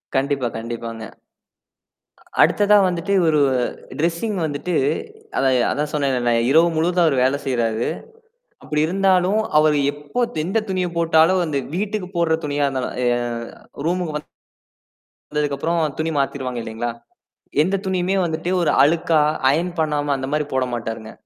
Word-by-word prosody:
கண்டிப்பா, 135 -1 0
கண்டிப்பாங்க. 115 -1 -6 1.4
அடுத்ததா 210 0 +5
வந்துட்டு 175 +2 -2
இவரு 155 -3 +3 0.6
டிரெஸ்ஸிங் 170 +6 -1
வந்துட்டு 155 +4 -3 0.6
அதான் 130 -1 +3 0.2
அதான் 150 +1 -2
சொன்னேன் 140 -3 +1
இல்ல 120 0 +1 0.2
இரவு 165 +3 +6
முழுவதும் 175 +2 +2
அவர் 135 -5 +2
வேலை 135 +2 +2
செய்றாரு. 115 -3 0 0.8
அப்படி 150 0 -1
இருந்தாலும் 190 +2 +2 0.2
அவர் 155 0 +4 0.2
எப்ப 145 +12 -2 0.2
எந்த 190 +6 -1
துணியை 185 -1 -1
போட்டாலும் 165 +2 +4
அந்த 150 -3 -2 0.2
வீட்டுக்கு 200 0 -2
போடுற 165 -1 +2
துணியா 145 -1 0
இருந்தாலும் 130 -2 -3
ய - - +3 0.2
அ 120 +3 -7
ரூம்க்கு 175 -2 -1
வந்து. 150 - -11 1.1
வந்ததுக்கு 150 -1 0
அப்புறம் 165 +3 0
துணி 160 +1 -1
மாத்திருவாங்க 130 -3 -2
இல்லைங்களா? 115 +1 -4 0.7
எந்த 190 +4 +1
துணியுமே 185 0 0
வந்துட்டு 160 +1 -2
ஒரு 170 - +2
அழுக்கா 160 +1 +3 0.3
ஐயன் 175 +3 -1
பண்ணாம 150 -2 0
அந்த 130 0 -4
மாதிரி 150 0 +1
போட 130 -1 +1
மாட்டாருங்க. 115 -2 -5
155 Hz, 135 wpm, -21 LUFS, 135-175 Hz, 1.4 s, இரவு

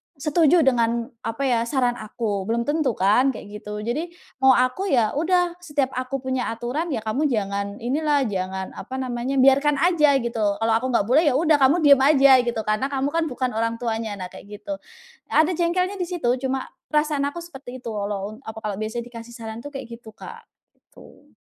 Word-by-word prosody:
setuju 315 +3 +3
dengan 235 -1 +1 0.2
apa 225 +5 -3
ya, 245 -4 +2
saran 245 -2 0
aku 210 -2 -3
belum 235 +1 0
tentu 290 -3 0
kan 245 +8 +3
kayak 210 +1 -9
gitu. 210 0 -6
Jadi 250 +10 -2 0.3
mau 265 -1 +6
aku, 255 +11 +1
ya 235 - +2
udah 350 +3 +1
setiap 290 -6 -1
aku 255 +1 -4
punya 260 -1 -1
aturan, 260 +9 -3
ya 235 -8 -3
kamu 260 +8 0
jangan 200 -4 -2
inilah, 290 +2 +1
jangan 190 -3 -3
apa 260 - -8
namanya, 255 0 -3
biarkan 275 +3 +4
aja 300 -2 +3
gitu. 220 -4 0
Kalau 225 +2 0
aku 230 +4 +1
nggak 235 -5 +2
boleh, 285 +9 +3
ya 260 - +3
udah 310 0 +3
kamu 285 +5 +4
diem 280 -2 +7
aja 275 -1 +6
gitu. 230 -2 -1
Karena 215 +5 0
kamu 280 0 -1
kan 330 0 0
bukan 255 -2 -2
orang 230 0 0
tuanya. 225 -2 -3
Nah, 185 -2 -7
kayak 205 0 -12
gitu. 295 -1 -5 0.5
Ada 315 +3 +3
jengkelnya 365 +3 0
di 360 - -2
situ, 335 -9 0 0.2
cuma 265 0 -2 0.2
perasaan 300 -2 +1
aku 340 +4 -6
seperti 265 -6 -10
itu, 230 - -4
walau 205 -1 -3
un - - -10
apa 220 - -6
kalau 210 -1 -3
biasanya 225 +2 -3
dikasih 230 0 -10
saran 225 -1 -7
itu 265 - -8
kayak 245 -5 -8
gitu, 220 -2 -14
Kak. - - -11 0.3
Gitu. - - -19
255 Hz, 195 wpm, -23 LUFS, 225-290 Hz, 0.5 s, diem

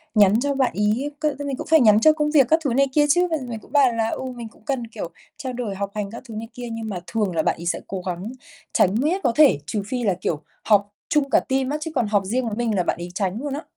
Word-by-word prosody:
nhắn 205 +1 +5
cho 285 +2 0
bạn 265 -2 +1
ấy 215 +8 0
c - - -17 0.2
thì 285 - -4
mình 275 -2 -2
cũng - - -6
phải 320 -1 +7
nhắn 215 -2 +6
cho 310 +6 +6
công 300 -1 0
việc 275 -5 +5
các 320 +1 +5
thứ 250 - +1
này 275 +2 +3
kia 295 -1 +4
chứ, 355 +4 +4
và 320 - +2
mình 225 -2 -5
cũng - - -19
bảo 280 -4 +5
là, 225 0 0
ừ, - - -4
mình 235 -2 -7
cũng 215 - -24
cần, 250 -4 -2
kiểu, 215 -6 -6 0.3
trao 260 -2 -5
đổi 230 -5 -4
học 200 0 -3
hành 205 -1 -3
các 235 - -9
thứ 220 - -7
này 225 +1 -5
kia. 245 -2 -7
Nhưng 225 -1 -5
mà 185 -3 -4
thường 205 -6 -1
là 160 - +2
bạn - - +1
ấy 170 - -7
sẽ 170 - 0
cố 190 -2 -4
gắng 180 +6 -4 0.4
tránh 190 +3 +3
miết 340 +8 +1
có 245 - +3
thể, 295 - +6
trừ 200 +4 -3
phi 250 0 -2
là, 195 -4 +2
kiểu, 150 -2 -2 0.2
họp 205 -1 +3 0.2
chung 290 -2 +2
cả - - +5
team 265 0 -1
á, 300 - -1
chứ 320 - -4
còn 240 -5 +1
họp 205 -2 +1
riêng 245 +5 -1
với 210 - -3
mình 230 -3 0
là 180 - +2
bạn - - -1
ấy 175 +1 -6
tránh 195 +3 -1
luôn 285 -2 -3
á. 295 - -4
230 Hz, 305 wpm, -23 LUFS, 205-275 Hz, 0.4 s, phải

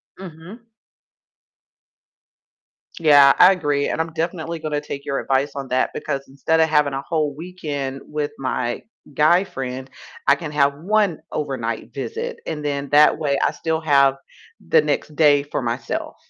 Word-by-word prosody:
Mhm. 190 +6 -12 2.3
Yeah, 145 -4 +7
I 180 +2 +8
agree, 145 -6 0
and 160 - -1
I'm 165 - -4
definitely 165 0 -3
gonna 150 -1 -3
take 140 -1 -7
your 140 - -2
advice 135 +2 0
on 135 -1 -5
that, 130 +1 0
because 140 -2 -4
instead 140 +4 0
of 160 - +4
having 150 -2 +2
a 135 - -2
whole 155 -4 -1
weekend 145 -5 -5
with 150 -1 -3
my 125 -2 -2 0.3
guy 165 +6 +4
friend, 130 -6 -6 0.4
I 140 - +6
can 155 -1 -7
have 140 -1 +2
1 195 +2 0
overnight 120 -7 -4
visit, 470 - -5
and 150 -1 -4
then 140 -1 -2
that 150 +1 +5
way 140 -3 0
I - - +2
still 160 0 -2
have 140 -3 +4 0.5
the 475 -1 +5
next 150 - -2
day 145 -2 +4
for 145 - -4
myself, 120 0 -4
150 Hz, 155 wpm, -21 LUFS, 140-160 Hz, 2.3 s, I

